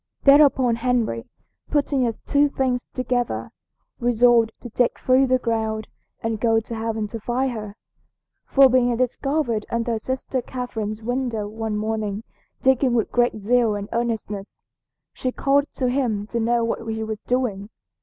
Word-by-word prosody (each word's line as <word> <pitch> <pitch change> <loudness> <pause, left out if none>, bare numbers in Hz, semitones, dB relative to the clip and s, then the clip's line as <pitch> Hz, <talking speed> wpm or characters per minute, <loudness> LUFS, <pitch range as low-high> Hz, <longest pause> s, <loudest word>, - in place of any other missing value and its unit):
Thereupon 275 -4 +5
Henry, 230 - 0 0.4
putting 285 -3 +1
the 230 - 0
two 290 0 +3
things 255 -3 -1
together, 250 -1 -2 0.5
resolved 240 -1 +4
to 240 - -8
dig 245 +2 +1
through 260 +1 +3
the 255 0 +3
ground 220 -3 -2 0.4
and 225 -1 -1
go 225 0 +3
to 225 +1 -8
heaven 220 -1 -2
to 230 - -6
find 250 +4 -1
her; 210 -3 -6 0.7
for 275 -1 +6
being 245 -2 +2
discovered 255 -2 0
under 230 -1 -1
sister 260 +2 -3
Catherine's 225 -4 -5
window 245 -3 -2
one 220 0 -3
morning 215 -1 -2 0.4
digging 265 -1 +3
with 225 - 0
great 240 -1 +2
zeal 225 +1 +2
and 205 0 -5
earnestness, 220 -4 -3 0.5
she 255 - -2
called 280 +2 +2
to 255 - 0
him 245 -6 0
to 235 - -2
know 235 +1 +2
what 230 0 -2
he 220 0 -3
was 220 0 -5
doing. 225 -6 -1
235 Hz, 150 wpm, -23 LUFS, 220-255 Hz, 0.7 s, for